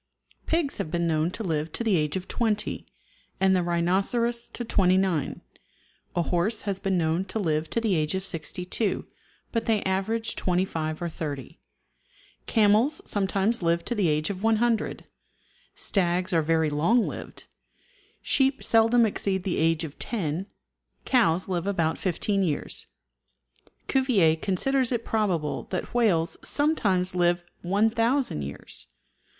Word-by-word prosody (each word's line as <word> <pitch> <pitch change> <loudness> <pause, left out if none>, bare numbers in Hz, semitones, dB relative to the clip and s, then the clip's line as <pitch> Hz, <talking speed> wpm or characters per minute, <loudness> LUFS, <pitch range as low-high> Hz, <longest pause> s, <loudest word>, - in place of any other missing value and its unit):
Pigs 325 -4 0
have - - -2
been 170 +1 0
known 160 0 +1
to 220 - -5
live 160 -3 -2
to - - -2
the 220 -4 +2
age 150 -1 0
of 185 0 -4
20, 220 -3 -1 0.5
and 190 0 +4
the 180 - +2
rhinoceros 195 +8 0
to 240 - -5
29; 185 -6 +1 0.7
a 175 - +2
horse 185 +6 0
has 200 -2 -1
been 190 -1 0
known 165 +2 +1
to 200 - -4
live 160 -5 0
to - - 0
the 225 -4 +1
age 155 0 +1
of 190 0 -3
62, 180 +5 -2 0.5
but 230 -1 -1
they 220 -2 +2
average 220 +4 -1
25 175 -3 -1
or - - -1
30; 145 -5 -6 0.9
camels 220 +7 +3
sometimes 200 +3 0
live 170 0 +1
to - - -1
the 205 -6 +1
age 155 +4 +1
of 190 -1 -6
100; 225 +1 +1 0.7
stags 180 -1 0
are 165 - +4
very 160 0 +1
long 190 +11 +3
lived; - - -7 0.8
sheep 270 0 +2
seldom 225 +1 +4
exceed 195 -3 -1
the 190 -3 -1
age 165 +1 +2
of 150 -3 -8
10; 185 -4 -2 0.6
cows 195 -9 +3
live 180 -1 -2
about 165 -5 0
15 195 +2 0
years. 155 -6 -2 1.0
Cuvier 220 - +3
considers 240 +10 0
it 235 -2 -1
probable 185 -9 -1
that 185 - -4
whales 190 -9 +2
sometimes 200 - +1
live 175 -1 +2 0.2
1000 225 - +1
years. 70 -3 -3
190 Hz, 140 wpm, -26 LUFS, 165-225 Hz, 1.0 s, and